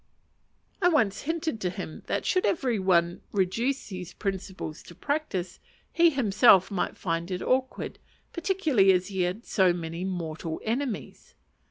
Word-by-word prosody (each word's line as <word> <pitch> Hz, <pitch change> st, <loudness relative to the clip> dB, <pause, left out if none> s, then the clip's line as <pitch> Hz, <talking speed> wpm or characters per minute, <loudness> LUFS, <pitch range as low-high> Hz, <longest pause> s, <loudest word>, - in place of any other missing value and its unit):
I 355 Hz, -, +5 dB
once 220 Hz, -, +2 dB
hinted 320 Hz, -6 st, -2 dB
to 180 Hz, -, 0 dB
him 175 Hz, -3 st, -7 dB
that, -, -, -1 dB
should 370 Hz, -, +2 dB
every 250 Hz, -, +1 dB
one 175 Hz, -2 st, +2 dB
reduce 225 Hz, +9 st, 0 dB
these 180 Hz, -3 st, -7 dB
principles 190 Hz, -5 st, -4 dB
to 175 Hz, -, -14 dB
practice, 250 Hz, -, -3 dB, 0.3 s
he 340 Hz, 0 st, +6 dB
himself 210 Hz, -, +5 dB
might 195 Hz, -, -2 dB
find 170 Hz, 0 st, -2 dB
it 180 Hz, -1 st, -3 dB
awkward; 260 Hz, 0 st, -1 dB, 0.3 s
particularly 335 Hz, -, +3 dB
as 180 Hz, +1 st, 0 dB
he 190 Hz, -2 st, -2 dB
had 180 Hz, +6 st, -2 dB
so 185 Hz, -3 st, +3 dB
many 170 Hz, 0 st, -5 dB
mortal 165 Hz, -3 st, -4 dB
enemies. 240 Hz, +1 st, -3 dB
195 Hz, 145 wpm, -27 LUFS, 180-260 Hz, 0.3 s, he